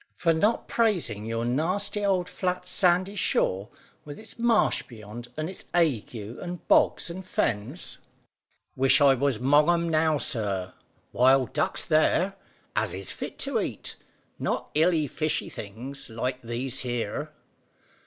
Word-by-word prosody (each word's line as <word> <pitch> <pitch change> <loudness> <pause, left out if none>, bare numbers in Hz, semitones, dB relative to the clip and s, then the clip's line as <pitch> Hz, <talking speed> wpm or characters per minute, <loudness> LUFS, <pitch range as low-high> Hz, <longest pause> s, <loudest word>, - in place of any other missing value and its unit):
"For 165 -1 +2
not 210 +8 +1
praising 175 - +1
your 115 +1 -2
nasty 185 - 0
old 185 -3 +1
flat 180 -1 -2
sandy 185 +1 +2
shore, 100 - +1 0.3
with 145 -1 -9
its 220 +2 -12
marsh 230 -2 +3
beyond, 115 +1 -10
and 155 0 -2
its 185 - -7
ague 150 -10 +1
and 120 - -7
bogs - - +3
and 185 +2 -7
fens." 120 - -1 0.8
"Wish 135 +3 +4
I 140 -2 +6
was 135 -2 +1
'mong 145 +7 +4
'em 170 -1 +1
now, 155 -1 +3
sir. 100 -8 -2 0.4
Wild 130 0 +4
ducks - - 0
there, 170 +4 +3 0.4
as - - 0
is - - -6
fit - - -6
to 275 -5 0
eat, 120 - -4 0.4
not - - -2
iley 160 0 +3
fishy 155 +3 -2
things 120 +8 -7
like 125 +3 -3
these 120 +2 -2
here." 120 -4 -3
150 Hz, 140 wpm, -27 LUFS, 120-180 Hz, 0.8 s, I